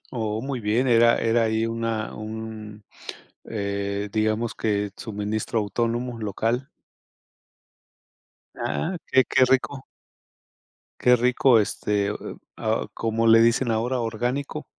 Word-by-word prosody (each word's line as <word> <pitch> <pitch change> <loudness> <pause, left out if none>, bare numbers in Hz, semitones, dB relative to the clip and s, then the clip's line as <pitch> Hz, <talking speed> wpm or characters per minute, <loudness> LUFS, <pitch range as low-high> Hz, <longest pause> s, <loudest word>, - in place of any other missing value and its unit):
Oh, 110 -1 -2
muy 135 -2 -3
bien. 115 +5 +1
Era 115 0 +5
era 115 +1 +2
ahí 110 0 +1
una 115 -1 -2
un 110 -1 -7 0.6
eh, 100 -1 -3
digamos 110 +1 0
que 105 -2 -1
suministro 110 +1 -3
autónomo 115 +3 -2
local. 115 +5 -1 1.9
Ah, 180 +3 -2
qué 130 -1 +5
qué 130 -1 +4
rico. 130 +1 0 1.2
Qué 125 0 +6
rico. 125 0 +4
Este, 105 -1 0
eh - - -3 0.4
ah, 110 0 -1
¿cómo 115 0 0
le 115 0 +7
dicen 115 +1 +3
ahora? 120 +3 0
¿Orgánico? 125 +6 -3
115 Hz, 115 wpm, -24 LUFS, 110-120 Hz, 1.9 s, le